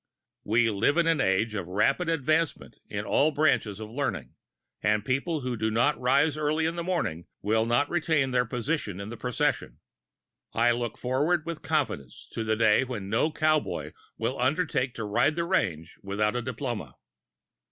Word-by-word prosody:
We 115 Hz, +2 st, +2 dB
live 110 Hz, +10 st, +2 dB
in 170 Hz, -, +4 dB
an 165 Hz, -1 st, +2 dB
age 95 Hz, +4 st, +1 dB
of 95 Hz, -5 st, -4 dB
rapid 135 Hz, -, +1 dB
advancement 160 Hz, +1 st, 0 dB
in -, -, -4 dB
all 150 Hz, -, +3 dB
branches 140 Hz, -9 st, +1 dB
of 110 Hz, 0 st, -7 dB
learning, 115 Hz, -, -3 dB, 0.5 s
and 105 Hz, 0 st, +1 dB
people 140 Hz, +4 st, -1 dB
who 125 Hz, -1 st, -2 dB
do 110 Hz, 0 st, 0 dB
not 120 Hz, +7 st, +2 dB
rise 140 Hz, +4 st, +2 dB
early 155 Hz, +1 st, +1 dB
in 165 Hz, +1 st, -1 dB
the 170 Hz, -, -3 dB
morning 165 Hz, -, -2 dB, 0.2 s
will 110 Hz, +2 st, +2 dB
not 120 Hz, +5 st, +2 dB
retain 155 Hz, -5 st, +1 dB
their 125 Hz, -1 st, +3 dB
position 120 Hz, -, -2 dB
in 100 Hz, +1 st, -6 dB
the 120 Hz, -, -6 dB
procession. 125 Hz, +1 st, -1 dB, 0.8 s
I 120 Hz, +1 st, +4 dB
look 120 Hz, -2 st, -2 dB
forward 150 Hz, +7 st, 0 dB
with 170 Hz, -2 st, -5 dB
confidence 140 Hz, -, -2 dB
to 115 Hz, -, -3 dB
the 110 Hz, 0 st, +1 dB
day 110 Hz, +2 st, +4 dB
when 110 Hz, -7 st, -5 dB
no 135 Hz, +8 st, +2 dB
cowboy 155 Hz, -1 st, 0 dB, 0.2 s
will 120 Hz, +4 st, -2 dB
undertake 130 Hz, -1 st, 0 dB
to 110 Hz, -, -4 dB
ride 145 Hz, +9 st, +2 dB
the 170 Hz, 0 st, -1 dB
range 90 Hz, -, -1 dB
without 105 Hz, +3 st, -1 dB
a 125 Hz, -, 0 dB
diploma. 120 Hz, -, -4 dB
125 Hz, 175 wpm, -27 LUFS, 110-155 Hz, 0.8 s, in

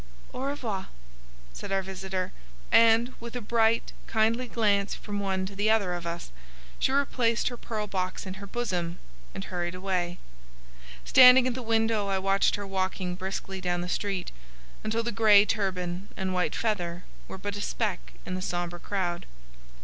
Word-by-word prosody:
"Au -, -, -6 dB
revoir," 245 Hz, -9 st, -3 dB, 0.7 s
said -, -, -7 dB
our 195 Hz, 0 st, +1 dB
visitor, 190 Hz, -1 st, -4 dB, 0.4 s
and, 230 Hz, +2 st, +6 dB
with 235 Hz, +1 st, -8 dB
a -, -, -1 dB
bright, 225 Hz, 0 st, +2 dB
kindly 225 Hz, +3 st, +1 dB
glance 205 Hz, -4 st, +1 dB
from 205 Hz, -1 st, -5 dB
one 190 Hz, -1 st, -1 dB
to 195 Hz, +1 st, -7 dB
the 205 Hz, +2 st, +1 dB
other 205 Hz, -5 st, +3 dB
of 175 Hz, -1 st, -4 dB
us, 170 Hz, -, -5 dB, 0.5 s
she -, -, +2 dB
replaced 250 Hz, -4 st, +2 dB
her 245 Hz, -, -6 dB
pearl 220 Hz, -2 st, -4 dB
box 185 Hz, -2 st, -3 dB
in 190 Hz, +1 st, -7 dB
her 200 Hz, -, -7 dB
bosom 180 Hz, -7 st, -2 dB, 0.4 s
and 95 Hz, -, -4 dB
hurried 175 Hz, 0 st, -3 dB
away. 180 Hz, -2 st, -1 dB, 0.9 s
Standing 255 Hz, 0 st, +9 dB
at 255 Hz, -, +1 dB
the 255 Hz, -, -5 dB
window, 225 Hz, -2 st, +1 dB
I 195 Hz, -1 st, +1 dB
watched 195 Hz, +1 st, +2 dB
her 205 Hz, -, -5 dB
walking 190 Hz, -1 st, -2 dB
briskly 190 Hz, +1 st, -5 dB
down 175 Hz, -1 st, 0 dB
the 175 Hz, -, -4 dB
street, 195 Hz, 0 st, -2 dB, 0.5 s
until 225 Hz, +1 st, 0 dB
the 235 Hz, -, -2 dB
grey 210 Hz, -1 st, +6 dB
turban 185 Hz, -3 st, -2 dB
and 190 Hz, -1 st, -1 dB
white 180 Hz, -4 st, 0 dB
feather 180 Hz, -6 st, -1 dB, 0.2 s
were -, -, -7 dB
but 205 Hz, +1 st, -4 dB
a 205 Hz, -, -4 dB
speck -, -, -2 dB
in 185 Hz, -, -4 dB
the 185 Hz, -, -3 dB
sombre 175 Hz, -1 st, -3 dB
crowd. 175 Hz, -3 st, -2 dB
195 Hz, 170 wpm, -28 LUFS, 185-225 Hz, 0.9 s, Standing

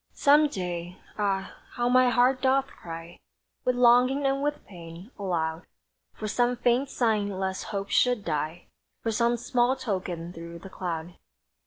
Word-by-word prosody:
Some 295 Hz, +1 st, +5 dB
day! 180 Hz, -6 st, -5 dB, 0.2 s
ah, 195 Hz, -2 st, -1 dB, 0.2 s
how 240 Hz, 0 st, 0 dB
my 255 Hz, 0 st, +5 dB
heart 250 Hz, +2 st, +3 dB
doth 265 Hz, 0 st, +3 dB
cry 165 Hz, -7 st, -10 dB, 0.5 s
With 250 Hz, -, +2 dB
longing 250 Hz, +3 st, +4 dB
and 270 Hz, 0 st, +1 dB
with 295 Hz, +1 st, -2 dB
pain, 175 Hz, +3 st, -11 dB
aloud, 165 Hz, -3 st, -2 dB, 0.5 s
For 215 Hz, -, -5 dB
some 245 Hz, +3 st, +1 dB
faint 245 Hz, +3 st, +2 dB
sign 220 Hz, -6 st, +1 dB
lest 190 Hz, -1 st, -3 dB
hope 200 Hz, -1 st, -4 dB
should 245 Hz, -5 st, +3 dB
die; 155 Hz, +2 st, -2 dB, 0.4 s
For 225 Hz, -, 0 dB
some 235 Hz, +2 st, +2 dB
small 245 Hz, +2 st, +1 dB
token 185 Hz, -8 st, -4 dB
through 170 Hz, 0 st, -8 dB
the 190 Hz, +3 st, -11 dB
cloud! 170 Hz, -1 st, -5 dB
210 Hz, 150 wpm, -27 LUFS, 175-250 Hz, 0.5 s, Some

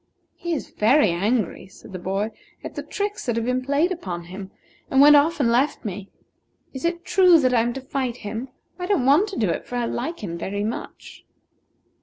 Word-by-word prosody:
"He 345 Hz, -1 st, -3 dB
is 300 Hz, -, -4 dB
very 220 Hz, -, +4 dB
angry," 205 Hz, +4 st, -1 dB
said 190 Hz, +1 st, -15 dB
the 185 Hz, -, -5 dB
boy, 195 Hz, +4 st, -2 dB, 0.3 s
"at -, -, -7 dB
the -, -, -4 dB
tricks 410 Hz, -5 st, -4 dB
that 240 Hz, -, +1 dB
have 230 Hz, 0 st, -1 dB
been 250 Hz, +1 st, 0 dB
played 285 Hz, +7 st, +1 dB
upon 180 Hz, -, -4 dB
him, 190 Hz, +3 st, -8 dB, 0.4 s
and 265 Hz, -, +2 dB
went 295 Hz, +1 st, +9 dB
off 300 Hz, +3 st, +3 dB
and 240 Hz, -5 st, +3 dB
left 255 Hz, +2 st, +1 dB
me. 200 Hz, -1 st, -5 dB, 0.6 s
Is 265 Hz, +4 st, -5 dB
it 340 Hz, 0 st, -2 dB
true 360 Hz, -2 st, +6 dB
that 255 Hz, -3 st, +2 dB
I 235 Hz, -, +4 dB
am 235 Hz, +1 st, 0 dB
to 270 Hz, -, -6 dB
fight 260 Hz, -2 st, -3 dB
him? 225 Hz, +5 st, -4 dB, 0.3 s
I 360 Hz, -, -3 dB
don't 365 Hz, -11 st, +1 dB
want 305 Hz, +11 st, +4 dB
to 395 Hz, -, -6 dB
do 205 Hz, -6 st, +1 dB
it, -, -, -3 dB
for 245 Hz, -, -6 dB
I 240 Hz, -1 st, 0 dB
like 330 Hz, +3 st, -4 dB
him 170 Hz, -3 st, -4 dB
very 200 Hz, +4 st, -3 dB
much." 220 Hz, +2 st, -6 dB
250 Hz, 215 wpm, -23 LUFS, 205-300 Hz, 0.6 s, went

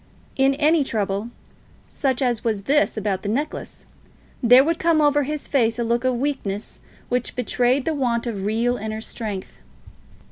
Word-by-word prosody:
In 270 Hz, 0 st, +3 dB
any 305 Hz, +1 st, +3 dB
trouble, 205 Hz, -2 st, -2 dB, 0.6 s
such 265 Hz, -2 st, -1 dB
as 240 Hz, -3 st, 0 dB
was 215 Hz, -4 st, -1 dB
this 290 Hz, 0 st, +2 dB
about 205 Hz, -3 st, -1 dB
the 205 Hz, -, -4 dB
necklace, 285 Hz, +8 st, -4 dB, 0.6 s
there 245 Hz, +2 st, +7 dB
would 330 Hz, +2 st, 0 dB
come 330 Hz, -1 st, +3 dB
over 290 Hz, -1 st, +4 dB
his 295 Hz, +1 st, -4 dB
face 230 Hz, -4 st, +2 dB
a 240 Hz, -, 0 dB
look 235 Hz, +1 st, 0 dB
of 255 Hz, -1 st, +1 dB
weakness 235 Hz, -6 st, -3 dB, 0.3 s
which 250 Hz, 0 st, -1 dB
betrayed 250 Hz, +2 st, +1 dB
the 320 Hz, -, 0 dB
want 245 Hz, -5 st, 0 dB
of 210 Hz, -5 st, -4 dB
real 230 Hz, +4 st, 0 dB
inner 220 Hz, +1 st, -5 dB
strength. 210 Hz, -4 st, -6 dB
245 Hz, 165 wpm, -22 LUFS, 220-280 Hz, 0.6 s, there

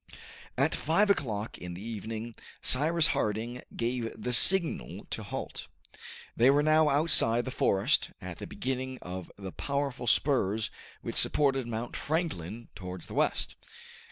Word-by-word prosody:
At -, -, +2 dB
five 200 Hz, +7 st, +3 dB
o'clock 110 Hz, -, -2 dB
in 90 Hz, -1 st, -7 dB
the 95 Hz, -, -8 dB
evening, 115 Hz, +1 st, -5 dB, 0.3 s
Cyrus 155 Hz, +5 st, +3 dB
Harding 115 Hz, +4 st, -2 dB
gave 120 Hz, -1 st, -2 dB
the 125 Hz, -, -3 dB
signal 170 Hz, -, +4 dB
to -, -, -2 dB
halt. -, -, -6 dB, 0.7 s
They 120 Hz, +3 st, +5 dB
were 145 Hz, +2 st, +4 dB
now 155 Hz, 0 st, +5 dB
outside 140 Hz, -6 st, +4 dB
the 130 Hz, -, -4 dB
forest, 100 Hz, -5 st, +2 dB
at -, -, -8 dB
the -, -, -6 dB
beginning 130 Hz, 0 st, -3 dB
of 90 Hz, 0 st, -7 dB
the 95 Hz, -2 st, -7 dB
powerful 140 Hz, -1 st, -3 dB
spurs 110 Hz, -5 st, +2 dB, 0.3 s
which -, -, -4 dB
supported 135 Hz, -4 st, +2 dB
Mount 115 Hz, +1 st, -4 dB
Franklin 120 Hz, -, -3 dB
towards 90 Hz, -2 st, -7 dB
the -, -, -10 dB
west. -, -, 0 dB
120 Hz, 140 wpm, -30 LUFS, 110-145 Hz, 0.7 s, They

